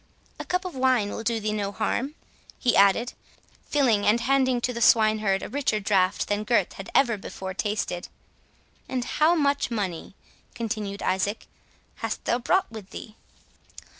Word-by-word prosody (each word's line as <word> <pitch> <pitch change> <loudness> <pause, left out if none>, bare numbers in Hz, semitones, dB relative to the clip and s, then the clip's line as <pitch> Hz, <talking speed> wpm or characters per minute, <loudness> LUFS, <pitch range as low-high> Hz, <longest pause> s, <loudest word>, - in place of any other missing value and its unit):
"A - - -5
cup 360 +1 -1
of 365 - -5
wine 255 -6 +2
will - - -5
do 230 0 0
thee 215 0 -2
no 200 -2 -2
harm," 255 +7 -2 0.4
he 245 - +1
added, 200 +5 +4 0.6
filling 245 -8 +3
and 215 +3 +4
handing 260 0 +2
to 250 - -1
the 235 - -5
swineherd 215 -3 +4
a - - -4
richer 255 -4 0
drought 195 -2 +1
than 205 +1 -1
Gurth 215 -4 +1
had 195 - -9
ever 235 -5 +4
before 190 -1 -6
tasted. 200 -3 -2 0.8
"And 250 -2 -2
how 310 +6 +3
much 285 -4 +1
money," 195 -6 -4 0.4
continued 210 -3 -4
Isaac, 200 +3 -1 0.5
"has - - -3
thou 240 - -1
brought 365 +4 +1
with 215 -3 -9
thee?" 215 - -9
220 Hz, 160 wpm, -25 LUFS, 205-255 Hz, 0.8 s, added